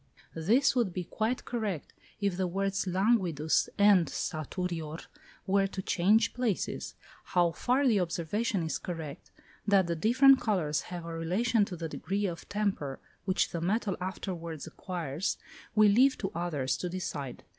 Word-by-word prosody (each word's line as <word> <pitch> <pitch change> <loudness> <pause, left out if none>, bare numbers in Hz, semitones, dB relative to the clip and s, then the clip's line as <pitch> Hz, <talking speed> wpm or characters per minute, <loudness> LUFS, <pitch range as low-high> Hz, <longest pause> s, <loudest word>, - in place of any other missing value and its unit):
This 220 - +3
would 230 -8 +1
be 180 - -3
quite 220 +7 -2
correct 210 - -3 0.3
if 200 -3 0
the 185 0 0
words 195 +2 -1
"languidus" 180 -5 +2
and 200 -4 +6
"saturior" 160 0 -3 0.5
were 195 0 +3
to 190 0 -5
change 205 +6 +3
places. 245 -6 -2 0.3
How 175 -2 +2
far 250 +10 +1
the 220 -5 +4
observation 180 +4 -1
is 160 - -2
correct, 160 -5 -6 0.4
that 200 -2 +5
the 170 0 -1
different 260 - +5
colours 170 -9 0
have 175 -2 -6
a 165 - -5
relation 200 +7 +1
to 185 - -6
the 165 -1 -4
degree 200 +5 -2
of 175 -3 -5
temper 195 -10 -1 0.3
which 185 -1 +1
the 170 - -3
metal 200 +2 0
afterwards 170 -4 -5
acquires, 165 -1 -3 0.4
we 215 -1 +7
leave 255 +7 +5
to 195 - -3
others 150 -7 -1
to 180 - -3
decide. 150 -7 -5
185 Hz, 150 wpm, -30 LUFS, 165-210 Hz, 0.5 s, we